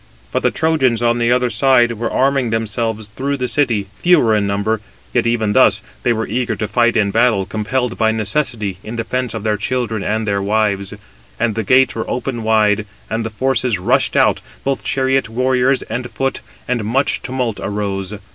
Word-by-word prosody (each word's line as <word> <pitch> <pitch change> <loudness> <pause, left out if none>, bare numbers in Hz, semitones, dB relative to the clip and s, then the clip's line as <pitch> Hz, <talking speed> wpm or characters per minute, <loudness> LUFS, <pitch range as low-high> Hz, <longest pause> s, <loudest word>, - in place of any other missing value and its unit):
But - - 0
the - - +3
Trojans, 135 -8 +1
on 120 0 +2
the 120 0 +2
other 125 -1 +2
side, 120 +1 +4
were 115 0 -3
arming 135 -2 +1
themselves 110 -1 -2
through 140 +6 -3
the 125 -1 -2
city, 115 -5 +1
fewer 150 -11 +4
in 105 -1 +1
number; 100 +2 -1 0.3
yet - - +2
even 110 -3 +1
thus, 100 -6 +4 0.2
they 120 - +1
were 110 -1 0
eager 120 +2 -1
to 105 - -3
fight 120 +2 +2
in 100 -2 +2
battle, 110 -4 +2
compelled 115 +4 -2
by 110 -1 +3
necessity, 110 -3 -2
in 110 +2 -6
defence 120 +1 -2
of 110 - -5
their 105 -1 0
children 115 -1 -2
and 110 +1 -1
their 100 -1 0
wives. 100 -1 0 0.4
And 115 -1 +1
the 110 - -1
gates 130 +5 +4
were 110 - -4
opened 125 -2 -3
wide, 110 -1 +2 0.2
and 115 +1 -1
the 110 - -3
forces 125 0 0
rushed 125 +9 +1
out, - - +3 0.2
both 135 0 -1
chariot 130 -2 +1
warriors 130 +2 +1
and 120 +1 -5
foot, 135 +1 -2 0.3
and 120 -3 -1
much 130 +7 0
tumult 125 -4 -3
arose. 100 -1 -3
115 Hz, 185 wpm, -18 LUFS, 105-125 Hz, 0.4 s, side